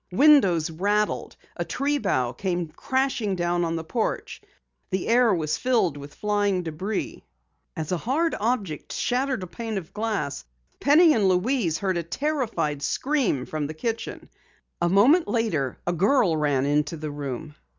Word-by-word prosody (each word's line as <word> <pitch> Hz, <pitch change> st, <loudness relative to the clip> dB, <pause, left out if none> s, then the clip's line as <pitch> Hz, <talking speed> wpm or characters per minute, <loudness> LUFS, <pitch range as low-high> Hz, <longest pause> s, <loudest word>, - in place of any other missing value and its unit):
Windows 195 Hz, -, +5 dB
rattled, 205 Hz, +5 st, 0 dB, 0.2 s
a -, -, -1 dB
tree 285 Hz, +1 st, -1 dB
bough 130 Hz, -, 0 dB
came 175 Hz, +3 st, -2 dB
crashing 250 Hz, -, -1 dB
down 175 Hz, 0 st, 0 dB
on 165 Hz, 0 st, -1 dB
the 165 Hz, -, -3 dB
porch, 220 Hz, +7 st, -3 dB, 0.5 s
the 190 Hz, -1 st, -2 dB
air 235 Hz, 0 st, +4 dB
was 155 Hz, -4 st, 0 dB
filled 235 Hz, -, +2 dB
with 145 Hz, 0 st, -10 dB
flying 205 Hz, -3 st, 0 dB
debris. 185 Hz, +6 st, -4 dB, 0.5 s
As 160 Hz, 0 st, -4 dB
a 180 Hz, -, +1 dB
hard 300 Hz, -, 0 dB
object 205 Hz, -, -2 dB
shattered 255 Hz, -3 st, -1 dB
a -, -, -3 dB
pane 225 Hz, +3 st, -5 dB
of 170 Hz, -4 st, -7 dB
glass, 210 Hz, -10 st, -2 dB, 0.4 s
Penny 310 Hz, +3 st, +6 dB
and 210 Hz, -7 st, +2 dB
Louise 185 Hz, -, +1 dB
heard 190 Hz, -1 st, -1 dB
a -, -, 0 dB
terrified 215 Hz, -, -2 dB
scream 245 Hz, -, 0 dB
from 155 Hz, -2 st, -3 dB
the 155 Hz, -, -7 dB
kitchen. 225 Hz, +8 st, -4 dB, 0.5 s
A 175 Hz, -, +2 dB
moment 255 Hz, -, +5 dB
later 170 Hz, -, -1 dB
a 175 Hz, -, 0 dB
girl 195 Hz, -, +3 dB
ran 145 Hz, -3 st, +1 dB
into 150 Hz, +2 st, 0 dB
the 155 Hz, -1 st, -5 dB
room. 145 Hz, +1 st, -5 dB
190 Hz, 155 wpm, -25 LUFS, 155-240 Hz, 0.5 s, Penny